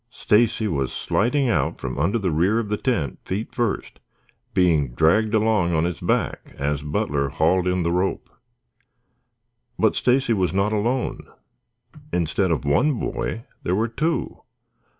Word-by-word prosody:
Stacy 110 Hz, 0 st, +2 dB
was 70 Hz, -8 st, -1 dB
sliding 130 Hz, +5 st, 0 dB
out 80 Hz, -, 0 dB
from -, -, -5 dB
under 95 Hz, +10 st, +1 dB
the 95 Hz, -5 st, -1 dB
rear 90 Hz, +8 st, +2 dB
of 115 Hz, -3 st, -2 dB
the 105 Hz, -, 0 dB
tent 85 Hz, -, -1 dB
feet 100 Hz, +4 st, -4 dB
first, 120 Hz, -4 st, -2 dB, 0.5 s
being 80 Hz, -9 st, +2 dB
dragged 105 Hz, -, +3 dB
along 105 Hz, -6 st, +2 dB
on 80 Hz, -, +2 dB
his 85 Hz, -2 st, -2 dB
back -, -, -2 dB
as 70 Hz, +1 st, -1 dB
Butler 75 Hz, -1 st, -1 dB
hauled 90 Hz, +6 st, +1 dB
in 90 Hz, -, +2 dB
on 90 Hz, -1 st, 0 dB
the 85 Hz, -, 0 dB
rope. 90 Hz, +2 st, -1 dB, 1.5 s
But -, -, +2 dB
Stacy 125 Hz, -1 st, +2 dB
was 95 Hz, -3 st, 0 dB
not 100 Hz, +2 st, +1 dB
alone. 120 Hz, +5 st, -1 dB, 0.8 s
Instead 90 Hz, +2 st, 0 dB
of 75 Hz, -5 st, -1 dB
one 75 Hz, -, +3 dB
boy 115 Hz, -, -3 dB, 0.2 s
there 90 Hz, -, 0 dB
were 110 Hz, +3 st, +1 dB
two. 160 Hz, +8 st, -2 dB
95 Hz, 150 wpm, -23 LUFS, 80-110 Hz, 1.5 s, dragged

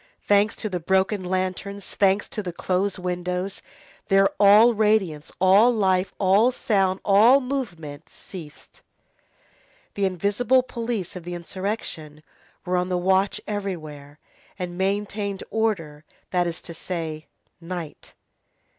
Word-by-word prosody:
Thanks 205 Hz, +1 st, +3 dB
to 220 Hz, -, -4 dB
the 185 Hz, -4 st, -3 dB
broken 190 Hz, +3 st, +1 dB
lanterns, 185 Hz, +2 st, -3 dB
thanks 195 Hz, 0 st, +2 dB
to 210 Hz, -, -4 dB
the 180 Hz, -3 st, -5 dB
closed 185 Hz, +3 st, -1 dB
windows, 180 Hz, +1 st, -3 dB, 0.5 s
there 195 Hz, 0 st, +5 dB
all 210 Hz, +4 st, +7 dB
radiance, 210 Hz, -8 st, +1 dB
all 195 Hz, +6 st, +6 dB
life, 190 Hz, -4 st, +1 dB
all 200 Hz, +5 st, +4 dB
sound, 195 Hz, -6 st, +1 dB
all 220 Hz, +7 st, +6 dB
movement 175 Hz, -, -5 dB
ceased. 160 Hz, -6 st, -11 dB, 1.1 s
The 200 Hz, -, 0 dB
invisible 205 Hz, +8 st, +2 dB
police 230 Hz, -7 st, -4 dB
of 180 Hz, -, -7 dB
the 175 Hz, +1 st, -5 dB
insurrection 170 Hz, -4 st, -5 dB, 0.4 s
were 180 Hz, 0 st, 0 dB
on 180 Hz, +1 st, -1 dB
the 180 Hz, -, 0 dB
watch 190 Hz, +2 st, +2 dB
everywhere, 155 Hz, -8 st, -5 dB, 0.4 s
and 180 Hz, -2 st, -5 dB
maintained 200 Hz, +1 st, -2 dB
order, 165 Hz, -10 st, -1 dB, 0.3 s
that 180 Hz, -1 st, +1 dB
is 170 Hz, 0 st, -5 dB
to 170 Hz, -, -9 dB
say, 160 Hz, -2 st, -5 dB, 0.3 s
night. 170 Hz, -2 st, -8 dB
190 Hz, 125 wpm, -24 LUFS, 175-205 Hz, 1.1 s, all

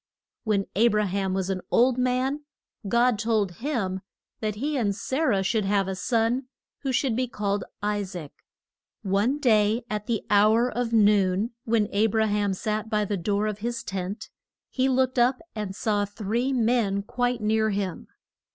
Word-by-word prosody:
When 205 Hz, -3 st, +1 dB
A 225 Hz, +4 st, +5 dB
bra 210 Hz, -2 st, +2 dB
ham 190 Hz, 0 st, -1 dB
was 190 Hz, 0 st, -1 dB
an 185 Hz, -1 st, -2 dB
old 255 Hz, +1 st, +3 dB
man, 255 Hz, +3 st, 0 dB, 0.4 s
God 235 Hz, +1 st, +3 dB
told 210 Hz, -5 st, 0 dB
him 220 Hz, -9 st, -2 dB, 0.4 s
that 215 Hz, -2 st, -2 dB
he 290 Hz, +7 st, -2 dB
and 210 Hz, -7 st, 0 dB
Sa 260 Hz, +6 st, -3 dB
rah 225 Hz, -11 st, +2 dB
should 215 Hz, +2 st, +1 dB
have 195 Hz, -1 st, +1 dB
a 190 Hz, -, -2 dB
son, 230 Hz, +6 st, 0 dB, 0.3 s
who 270 Hz, -, -2 dB
should 255 Hz, -2 st, +1 dB
be 255 Hz, +1 st, 0 dB
called 205 Hz, -3 st, -2 dB, 0.2 s
I 210 Hz, 0 st, 0 dB
saac. 180 Hz, -6 st, -7 dB, 0.7 s
One 205 Hz, +8 st, +1 dB
day 225 Hz, -3 st, +2 dB
at 210 Hz, -1 st, -3 dB
the 230 Hz, -3 st, -1 dB
hour 220 Hz, +4 st, +4 dB
of 240 Hz, -1 st, -2 dB
noon, 205 Hz, -1 st, +3 dB
when 220 Hz, -2 st, +2 dB
A 210 Hz, +2 st, +3 dB
bra 220 Hz, +1 st, +1 dB
ham 205 Hz, -2 st, 0 dB
sat 215 Hz, +2 st, -3 dB
by 210 Hz, -2 st, +1 dB
the 205 Hz, -, -1 dB
door 200 Hz, +3 st, 0 dB
of 210 Hz, -1 st, -3 dB
his 235 Hz, +2 st, -3 dB
tent, 190 Hz, +2 st, -5 dB, 0.4 s
he 265 Hz, 0 st, +1 dB
looked 260 Hz, -1 st, +1 dB
up 250 Hz, +2 st, +3 dB
and 210 Hz, -3 st, -4 dB
saw 205 Hz, -1 st, 0 dB
three 220 Hz, +5 st, -2 dB
men 225 Hz, -5 st, +1 dB
quite 245 Hz, +2 st, -1 dB
near 220 Hz, +1 st, +2 dB
him. 195 Hz, -4 st, -3 dB
215 Hz, 175 wpm, -26 LUFS, 200-240 Hz, 0.7 s, A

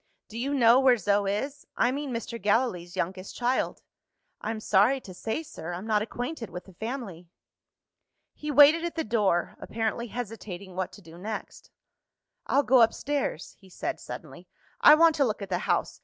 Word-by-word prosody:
"Do 225 Hz, -, -7 dB
you 280 Hz, +4 st, -1 dB
know 240 Hz, -1 st, +6 dB
where 260 Hz, -2 st, +5 dB
Zo 200 Hz, 0 st, +1 dB
is? 270 Hz, +9 st, -3 dB
I 245 Hz, -, +3 dB
mean, 285 Hz, +1 st, -3 dB
Mr. 235 Hz, -1 st, -5 dB
Gallilee's 200 Hz, -4 st, 0 dB
youngest 185 Hz, +2 st, -4 dB
child." 245 Hz, +1 st, -1 dB, 0.6 s
"I'm 220 Hz, 0 st, -3 dB
sorry 215 Hz, +6 st, +3 dB
to 190 Hz, -7 st, -11 dB
say, 220 Hz, -, -3 dB
sir, 175 Hz, -, -7 dB
I'm 180 Hz, +4 st, -6 dB
not 215 Hz, -2 st, +2 dB
acquainted 245 Hz, -, -5 dB
with 180 Hz, +1 st, -8 dB
the 190 Hz, -, -15 dB
family." 205 Hz, -5 st, -6 dB, 1.0 s
He 300 Hz, -, -7 dB
waited 295 Hz, +3 st, +7 dB
at 345 Hz, -2 st, -3 dB
the 325 Hz, -, -1 dB
door, 205 Hz, -6 st, +1 dB
apparently 225 Hz, +2 st, -2 dB
hesitating 200 Hz, -6 st, -7 dB
what 185 Hz, 0 st, -2 dB
to 205 Hz, -, -14 dB
do 165 Hz, +1 st, -13 dB
next. 215 Hz, +3 st, -7 dB, 0.8 s
"I'll 280 Hz, -, +3 dB
go 260 Hz, -2 st, +5 dB
upstairs," 260 Hz, -, 0 dB
he 190 Hz, -, -18 dB
said -, -, -4 dB
suddenly; -, -, -9 dB, 0.3 s
"I 300 Hz, -, +9 dB
want 330 Hz, +1 st, +6 dB
to 285 Hz, -, +4 dB
look 220 Hz, -5 st, -1 dB
at 195 Hz, -, -7 dB
the 180 Hz, -1 st, 0 dB
house. -, -, 0 dB
225 Hz, 175 wpm, -27 LUFS, 190-265 Hz, 1.0 s, I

